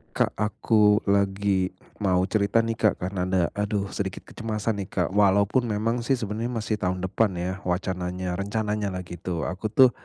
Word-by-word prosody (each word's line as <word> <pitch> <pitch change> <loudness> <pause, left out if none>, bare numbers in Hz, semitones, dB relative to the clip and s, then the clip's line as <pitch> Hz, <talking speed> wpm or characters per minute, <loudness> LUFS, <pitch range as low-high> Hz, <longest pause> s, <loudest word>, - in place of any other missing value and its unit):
Kak, - - +2
aku 105 0 +3
lagi 100 -1 +1 0.2
mau 95 -3 +2
cerita 100 +3 +2
nih 115 - -1
Kak, 105 -3 +3
karena 90 -1 -2
ada 95 -1 +2
aduh 100 -1 -2
sedikit 95 -2 -4
kecemasan 110 -1 -3
nih 95 - -4
Kak. 90 -3 -1
Walaupun 100 +4 +3
memang 115 +3 0
sih, 130 +3 +1
sebenernya 110 0 -3
masih 110 -1 -2
tahun 90 -1 -1
depan 95 +1 +1
ya 90 +2 -3
wacananya, 90 0 -2
rencananyalah 100 -2 -2
gitu. 85 -1 -4
Aku 95 +4 -3
tuh, 125 +4 +6
100 Hz, 160 wpm, -26 LUFS, 95-105 Hz, 0.2 s, tuh